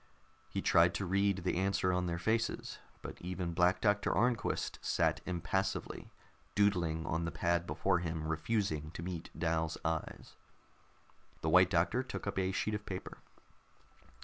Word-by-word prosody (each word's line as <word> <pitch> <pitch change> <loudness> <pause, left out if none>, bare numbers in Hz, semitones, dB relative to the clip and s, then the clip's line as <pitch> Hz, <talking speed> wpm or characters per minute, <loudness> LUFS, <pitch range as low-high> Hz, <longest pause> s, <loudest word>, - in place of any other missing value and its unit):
He - - -3
tried 85 +2 +5
to 100 - -1
read 100 0 +1
the 90 - 0
answer 95 -1 +1
on 90 0 0
their 85 0 -1
faces, 110 +6 -1 0.2
but - - -8
even 90 -1 -3
Black 90 +2 +3
Doctor 105 -1 +2
Arnquist 120 -1 0
sat - - +1
impassively, 90 +2 -2 0.4
doodling 85 -6 +2
on 80 +1 -1
the - - -1
pad 85 0 0
before 95 -2 +1
him, 80 -2 -3
refusing 80 -1 -1
to 85 - -5
meet 85 -2 -5
Dal's 80 -1 0
eyes. 80 -1 -3 1.1
The 80 - 0
White 90 +2 +6
Doctor 90 +6 +2
took 130 - -6
up 100 -1 -1
a 95 0 +1
sheet 105 +3 -1
of 105 0 -3
paper. 95 -2 -6
90 Hz, 150 wpm, -34 LUFS, 85-100 Hz, 1.1 s, White